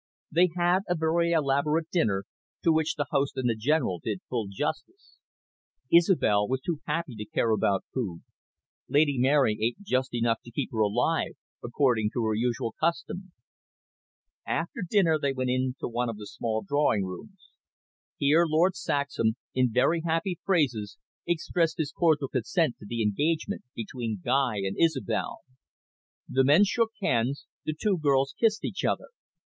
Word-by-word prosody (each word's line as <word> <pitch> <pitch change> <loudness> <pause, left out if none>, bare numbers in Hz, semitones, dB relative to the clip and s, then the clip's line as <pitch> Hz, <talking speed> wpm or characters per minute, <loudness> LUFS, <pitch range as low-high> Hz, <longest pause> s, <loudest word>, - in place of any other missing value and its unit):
They 175 +3 +4
had 175 +1 +3
a 175 - +2
very 165 +1 +1
elaborate 150 +1 +1
dinner, 105 - +1 0.4
to 165 - +4
which 160 0 +1
the 145 - -1
host 140 0 0
and 130 -1 0
the 115 - +1
General 110 - 0
did 105 -4 -3
full 115 -5 -2
justice. 130 - -5 0.7
Isobel 165 - +4
was 130 +1 -1
too 165 +1 -3
happy 155 -2 -2
to 105 -1 -6
care 110 +2 0
about 100 -3 +1
food. 100 -10 -3 0.7
Lady 145 -1 +3
Mary 130 -4 +3
ate 115 +2 0
just 130 -7 -1
enough 115 -1 +1
to - - -11
keep 135 +4 -3
her 115 - -4
alive, 120 +10 +1 0.3
according 120 -3 +1
to 120 -3 -1
her 110 - +1
usual 115 0 -1
custom. 175 +3 -2 1.1
After 170 +4 -3
dinner 170 -7 +3
they 140 -1 0
went 130 -1 -1
into 130 +1 -1
one 120 0 -1
of 115 - -5
the 105 - -8
small 110 +1 -3
drawing 145 -8 +2
rooms. 180 - -10 0.7
Here 150 +4 +4
Lord 165 +4 +3
Saxham, 140 -6 0 0.2
in 130 -2 +2
very 140 +8 +2
happy 165 +2 -1
phrases, 130 - 0 0.3
expressed 170 -1 0
his 155 -3 -2
cordial 155 -5 +2
consent 135 - 0
to 105 - -11
the 115 -1 -1
engagement 155 - 0
between 115 -2 -4
Guy 125 -5 +1
and 95 - -2
Isobel. 130 -9 0 0.9
The 130 +1 +2
men 145 +9 +6
shook 225 +2 +1
hands, 125 0 0 0.2
the 155 - -2
two 200 -4 +1
girls 135 -2 +2
kissed 225 -1 +1
each - - -4
other. - - -1
135 Hz, 155 wpm, -27 LUFS, 115-165 Hz, 1.1 s, men